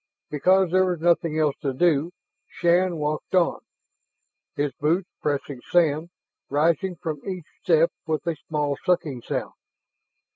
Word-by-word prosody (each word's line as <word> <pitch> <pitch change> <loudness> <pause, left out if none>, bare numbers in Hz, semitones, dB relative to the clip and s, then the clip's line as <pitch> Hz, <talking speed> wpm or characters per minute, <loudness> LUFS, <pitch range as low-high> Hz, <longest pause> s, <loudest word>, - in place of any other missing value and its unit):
Because 185 +4 +3
there 185 +1 +4
was 175 -2 -1
nothing 165 -1 +2
else 150 -3 +2
to 135 -2 -1
do, 160 +1 +2 0.4
Shann 175 0 +2
walked 150 +4 -2
on, 180 -2 +3 1.0
his 145 -1 0
boots 170 +5 +1
pressing 140 -3 -2
sand, 165 -1 +2 0.4
rising 165 +5 +1
from 155 -3 -5
each 185 -4 -5 0.2
step 165 -1 +4 0.2
with 155 +1 -1
a 170 -1 0
small 145 -2 -1
sucking 150 -8 0
sound. - - -4
160 Hz, 135 wpm, -24 LUFS, 150-175 Hz, 1.0 s, there